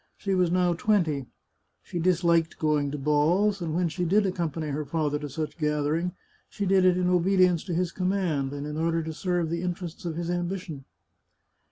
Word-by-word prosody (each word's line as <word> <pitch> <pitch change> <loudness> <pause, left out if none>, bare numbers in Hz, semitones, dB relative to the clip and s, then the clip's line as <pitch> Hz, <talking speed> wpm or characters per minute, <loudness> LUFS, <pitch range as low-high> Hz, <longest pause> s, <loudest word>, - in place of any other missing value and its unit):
She 195 - -2
was 180 -2 +3
now 180 0 +2
twenty. 165 - +1 0.6
She 175 - -5
disliked 170 -1 +2
going 150 -2 +1
to 150 - -4
balls, 165 +8 +2
and 160 -2 -2
when 175 0 +2
she 180 +3 -3
did 200 +5 +3
accompany 165 -4 -2
her 145 +2 -2
father 150 0 -1
to 145 -1 -6
such 155 +4 -5
gatherings, 150 +3 0 0.4
she 200 - -3
did 190 -1 +4
it 180 -1 +4
in 180 -1 +1
obedience 180 -1 +3
to 180 - -3
his 175 0 0
command, 180 -8 -1
and 145 0 -5
in 150 0 -5
order 165 0 0
to 160 0 -5
serve 175 -1 -1
the 170 0 -1
interests 175 -1 -5
of 170 -2 -3
his 170 +1 -3
ambition. 175 -5 -4
170 Hz, 190 wpm, -27 LUFS, 155-180 Hz, 0.6 s, did